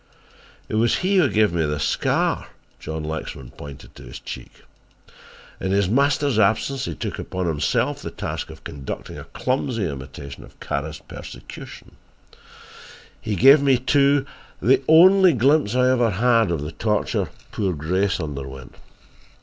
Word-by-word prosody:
"It - - -8
was 115 +2 +3
he 195 +1 +3
who 165 -7 +4
gave 105 -4 +2
me 85 -1 +1
this 75 -1 -1
scar," - - 0 0.3
John 80 0 -5
Lexman 75 -5 -6
pointed 70 -4 -11
to - - -12
his - - -9
cheek. - - -10 1.0
"In 95 - -2
his 100 -1 +2
master's 140 0 +2
absence 115 +6 +1
he 85 - -4
took - - -5
upon 90 0 -3
himself 75 -4 0
the - - -5
task - - -5
of - - -12
conducting 70 -2 -7
a - - -9
clumsy 125 -5 -2
imitation 70 -1 -8
of - - -17
Kara's 75 +2 -4
persecution. - - -10 1.2
He 105 - -2
gave 135 - +7
me, 135 -2 +4
too, 140 +2 +3 0.3
the 130 +4 +3
only 185 +3 +7
glimpse 130 -2 +2
I 130 0 +4
ever 120 -3 +3
had 115 +1 +3
of 85 -4 -1
the 75 - -5
torture 105 +6 -1 0.2
poor 100 -4 -1
Grace 90 +7 0
underwent. 70 -4 -6
105 Hz, 150 wpm, -22 LUFS, -, 1.2 s, gave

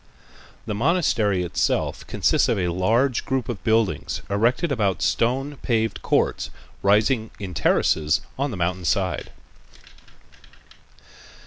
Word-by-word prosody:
The - - -3
monastery 110 - +1
itself 85 - -1
consists - - +2
of - - +1
a 90 -2 0
large 115 +9 +1
group 130 -3 -2
of 120 -5 -5
buildings 110 -2 0
erected 120 - +1
about 100 -9 0
stone 135 +5 0
paved 110 -3 -1
courts, - - 0 0.3
rising 110 +3 +2
in 95 -3 -6
terraces 75 -3 +2
on 140 +2 -1
the 110 - -5
mountain 90 +1 -1
side. 95 +1 0
110 Hz, 115 wpm, -23 LUFS, 95-125 Hz, 0.3 s, consists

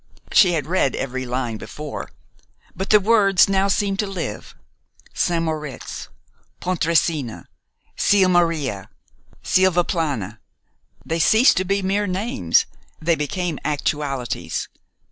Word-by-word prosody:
She 180 -4 +5
had 155 -3 -1
read 165 -6 +1
every 130 -1 -4
line 120 -2 -2
before; 150 -1 -7 0.7
but 190 +3 -4
the 210 - +7
words 200 -2 +4
now 195 0 +2
seemed 200 0 0
to 210 - 0
live. 170 - -6 0.6
St. 170 -1 0
Moritz, 150 -4 -5 0.5
Pontresina, 165 -7 0 0.5
Sils 190 -2 +3
Maria, 160 - 0 0.5
Silvaplana, 165 - +1 0.7
they 165 +1 -2
ceased 220 - +5
to 185 - +1
be 195 +1 0
mere 200 +2 0
names, 185 - +1 0.3
they 170 +2 +2
became 165 +1 -2
actualities. 145 -3 -2
170 Hz, 110 wpm, -21 LUFS, 140-190 Hz, 0.7 s, the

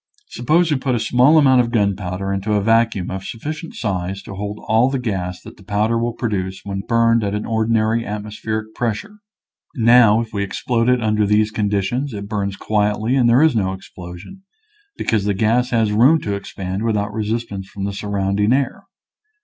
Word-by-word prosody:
Suppose 160 +7 +1
we 145 - +2
put 130 -1 -1
a - - 0
small 125 +7 +4
amount 130 -4 +5
of 120 - -2
gunpowder 100 -3 -1
into 100 +2 -2
a 105 -1 +1
vacuum 115 -4 +2
of 95 0 -5
sufficient 155 - -6
size 95 -2 -3
to - - -9
hold 105 +2 -5
all 115 +4 +3
the 135 - -1
gas 95 -7 -3
that - - -12
the 100 - -16
powder 105 +4 0
will 115 +1 -1
produce 95 -5 -3
when 100 -1 -4
burned 115 -1 +3
at 100 0 -1
ordinary 110 0 +1
atmospheric 110 +1 -5
pressure. 120 - -4 0.6
Now, 115 -3 +5
if 115 -2 -5
we 100 - -2
explode 115 +4 -1
it 125 -2 +2
under 105 -1 +1
these 105 +1 +2
conditions 105 +5 -1
it 100 0 -6
burns 100 -2 -2
quietly 105 +4 0
and 125 -3 +3
there 125 +6 +5
is 160 -6 +3
no 95 -3 0
explosion, 90 - -11 0.6
because 105 -3 0
the 100 -1 0
gas 115 +5 +1
has 115 -3 +1
room 130 +10 +5
to 100 - -3
expand 95 -1 -5
without 105 -2 -1
resistance 110 -2 -3
from 100 - -7
the 100 0 -2
sur 100 +1 -6
rounding 100 +2 +1
air. 135 0 -2
110 Hz, 185 wpm, -19 LUFS, 100-120 Hz, 0.6 s, amount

